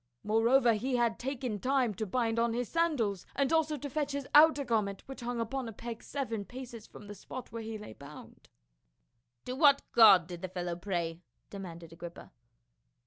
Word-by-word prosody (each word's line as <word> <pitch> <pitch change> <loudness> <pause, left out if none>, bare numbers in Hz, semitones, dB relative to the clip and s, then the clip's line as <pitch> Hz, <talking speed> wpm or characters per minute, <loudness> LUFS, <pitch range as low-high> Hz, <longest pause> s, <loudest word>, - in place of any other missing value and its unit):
Moreover, 230 +3 +4
he 250 +5 -1
had 235 -2 +1
taken 255 -4 -3
time 255 -1 +1
to 220 +2 -4
bind 230 +2 0
on 230 0 +1
his 245 0 -2
sandals, 260 - 0
and 275 +2 +1
also 315 -2 +2
to 285 - -5
fetch 290 0 -2
his 280 -1 -4
outer 295 -1 +7
gar 230 -3 +2
ment, 200 -1 -6
which 270 0 -9
hung 240 0 -3
upon 235 +2 -3
a - - -6
peg 230 +1 -7
seven 240 -7 -4
paces 240 -1 -9
from 205 - -13
the 205 - -8
spot 245 +5 -9
where 230 - -5
he 220 0 -5
lay 210 - -10
bound." 145 +2 -13 1.0
"To 250 - -4
what 280 -1 +5
god 205 -7 +8
did 175 -1 -8
the 185 - -4
fellow 175 -1 -3
pray?" 170 -2 -3 0.3
demanded 170 -4 -8
Agrippa. 170 0 -10
230 Hz, 190 wpm, -31 LUFS, 200-265 Hz, 1.0 s, god